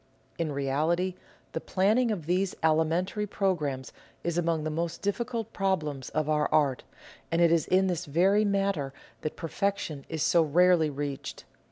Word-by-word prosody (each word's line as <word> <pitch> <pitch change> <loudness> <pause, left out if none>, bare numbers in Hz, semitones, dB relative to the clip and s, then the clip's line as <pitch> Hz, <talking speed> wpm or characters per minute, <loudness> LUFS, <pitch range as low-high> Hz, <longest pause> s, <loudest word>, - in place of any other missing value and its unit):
In 165 -2 -1
reality 155 +7 0 0.4
the - - -3
planning 215 +6 +2
of 190 -8 -2
these 180 +3 0
alimentary 165 +6 +1
programmes 150 -10 -1 0.3
is 170 -1 -1
among 165 -2 0
the 155 - -2
most 170 +5 -3
difficult 230 +2 -2
problems 150 -9 -1
of 155 -1 -1
our 150 -1 +1
art, 140 -4 +2 0.5
and 165 - +1
it 170 -1 +5
is 165 -3 +2
in 190 +1 +3
this 180 -2 -1
very 185 +8 +3
matter 195 -9 0 0.3
that 155 - -3
perfection 165 -4 -2
is 160 -2 -2
so 170 - +4
rarely 165 +1 +4
reached. 140 -1 -5
170 Hz, 155 wpm, -28 LUFS, 150-190 Hz, 0.5 s, it